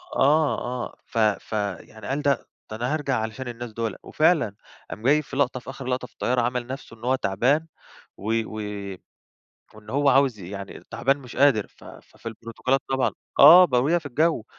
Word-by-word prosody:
آه 150 +2 +3 0.3
آه - - -12
ف - - -8
فـيعني 105 -1 -2
قال: 140 +2 -1
"ده 140 -4 0 0.2
ده - - -4
أنا 125 +5 -1
هارجع 145 -4 0
علشان 110 +4 -5
الناس 120 -1 -6
دوله" 115 -2 -3
وفعلًا 155 - +2 0.3
قام 105 - -8
جاي 145 +5 +4
في 140 -2 -10
لَقطة 130 -2 +1
في 125 - -11
آخر 135 0 -8
لَقطة 125 0 -2
في - - -31
الطيارة 125 0 0
عَمل 120 0 -1
نفسه 130 -2 -8
إن 110 - -19
هو 130 +1 +3
تعبان 130 - +1 0.5
و 105 +3 -3
و - - -10 1.2
وإن 105 0 -13
هو 140 +2 +2
عاوز 135 -4 +4
يعني 100 +2 -8
تعبان 135 +2 +1
مش 125 -3 -11
قادر، 130 -7 +4
ف - - -20
فـفي - - -15
البروتوكولات 115 +4 -2
طبعًا 135 -1 +2 0.3
آه 170 +6 +10
ب 165 - -3
وهي 145 +8 +3
في 155 - -11
الجو، 150 -2 +1
125 Hz, 185 wpm, -24 LUFS, 110-140 Hz, 1.2 s, آه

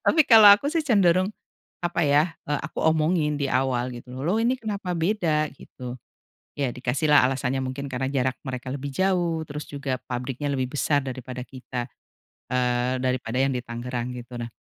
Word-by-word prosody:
Tapi 315 -3 +4
kalau 215 -3 +10
aku 255 +8 +3
sih 320 -1 0
cenderung, 190 - +3 0.5
apa 175 0 -1
ya, 150 +4 +3 0.2
eee, 150 -1 0
aku - - -6
omongin 155 -1 +2
di 140 -2 -1
awal 130 -1 0
gitu 125 +1 -9
loh 195 +8 +1
ini 240 +3 +2
kenapa 200 -6 -4
beda, 165 -5 +1
gitu. 125 -2 -9 0.5
Ya 140 -3 -1
dikasih 130 +5 -1
lah 145 -4 +7
alasannya 130 0 -1
mungkin 140 +2 -5
karena 130 0 -2
jarak 130 -1 0
mereka 130 0 -5
lebih 140 0 -4
jauh 175 -1 +1
terus 150 0 -6
juga 140 -2 -3
pabriknya 130 +3 -3
lebih 130 -1 -1
besar 145 0 +2
daripada 130 -1 -6
kita, 125 -1 -6 0.6
eee, 125 0 0
daripada 125 -2 -1
yang 135 - +2
di - - 0
Tangerang 120 +1 -4
gitu 120 +1 -10
nah, 115 0 -5
135 Hz, 170 wpm, -25 LUFS, 125-170 Hz, 0.6 s, kalau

